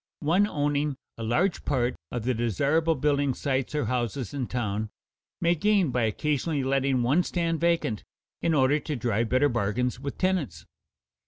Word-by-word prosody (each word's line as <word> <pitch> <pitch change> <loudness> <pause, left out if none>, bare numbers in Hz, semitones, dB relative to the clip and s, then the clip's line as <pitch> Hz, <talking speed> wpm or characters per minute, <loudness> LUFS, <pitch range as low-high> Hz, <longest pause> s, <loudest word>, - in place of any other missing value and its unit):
One 175 +7 +3
owning 145 -4 -1 0.2
a - - -5
large 120 - +1
part 125 -3 0 0.2
of 120 - -3
the 130 +2 +1
desirable 140 - +1
building 140 -1 +1
sites 135 0 -1
or 150 - 0
houses 120 +1 -2
in 135 -4 -2
town 110 -3 -2 0.5
may 170 0 +3
gain 195 -2 +2
by 120 -2 +1
occasionally 145 +5 -1
letting 135 -1 +1
one 140 +9 +3
stand 170 -2 -1
vacant 170 -11 0 0.4
in 165 -1 +2
order 140 +2 +3
to 150 +1 -4
drive 115 -2 0
better 130 +4 +4
bargains 120 +1 -1
with 140 0 -5
tenants. 160 - -1
135 Hz, 160 wpm, -27 LUFS, 120-155 Hz, 0.5 s, better